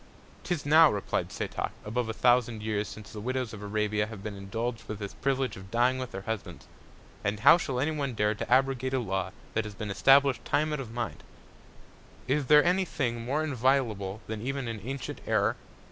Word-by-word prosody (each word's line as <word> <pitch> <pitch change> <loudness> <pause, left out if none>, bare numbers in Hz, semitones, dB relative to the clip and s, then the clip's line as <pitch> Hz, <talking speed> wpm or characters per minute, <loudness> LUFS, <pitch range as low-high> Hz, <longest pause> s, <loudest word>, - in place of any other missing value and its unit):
'Tis 175 -5 -2
now, 155 +1 +7
replied 100 -2 -2
Setoc, - - -3 0.2
above 115 +2 -2
a - - -1
thousand 120 -2 +2
Years 105 -1 -1
since 110 -2 -10
the 105 - -6
Widows 125 0 -2
of 105 - -8
Arabia 105 0 0
have 110 -3 -9
been 105 -1 -5
indulg'd 110 +4 -4
with 105 - -4
this 100 -1 -6
Privilege 135 -1 -1
of 95 0 -11
dying 125 +4 +2
with 130 -1 -4
their 95 - -6
Husbands; 110 -1 -5 0.6
and 105 +1 -1
how 140 - +9
shall 130 -6 -2
any 145 +4 +1
one 140 -5 -2
dare 105 0 +2
to 110 - -6
abrogate 130 0 +2
a - - +2
Law 95 -5 -2 0.2
that 115 - +1
has 105 -1 -8
been 105 0 -4
establish'd 135 +5 +4
Time 155 +1 +1
out 150 - -2
of 125 -5 -6
Mind? 120 0 -4 1.0
Is 135 +1 +1
there 150 0 +7
any 180 +2 +3
Thing 120 -9 -2
more 140 +6 0
inviolable 120 -8 0
than 110 -1 -5
even 135 +1 -3
an 115 -2 -4
antient 130 +5 -6
Error? - - +2
120 Hz, 200 wpm, -29 LUFS, 105-135 Hz, 1.0 s, how